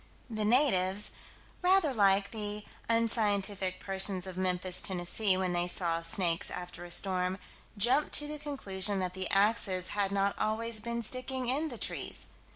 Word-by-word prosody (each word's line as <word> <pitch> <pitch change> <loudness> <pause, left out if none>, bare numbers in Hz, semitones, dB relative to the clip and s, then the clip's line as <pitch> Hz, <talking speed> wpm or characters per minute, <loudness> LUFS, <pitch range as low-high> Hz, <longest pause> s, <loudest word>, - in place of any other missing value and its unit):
The 215 -1 -2
natives, 210 -6 +2 0.5
rather 360 -5 +3
like 200 -2 +2
the 210 -1 -5 0.2
unscientific 205 -4 +1
persons 190 -1 0
of 185 -1 -7
Memphis, 185 0 0
Tenn., 190 -3 -1 0.4
when 185 -1 -1
they 175 0 0
saw 170 -2 0
snakes 165 0 0
after 175 -1 -7
a 175 - -10
storm, 185 +1 0 0.4
jumped 245 +8 +3
to 295 - +6
the 300 0 -6
conclusion 205 -9 -2
that 185 -1 -2
the 190 0 -3
"axes" 195 -3 +2
had 200 -1 -1
not 200 0 0
always 220 +1 +1
been 235 +2 -2
sticking 255 +2 +1
in 290 +5 0
the 240 - -6
trees. - - -2
200 Hz, 155 wpm, -30 LUFS, 185-230 Hz, 0.5 s, to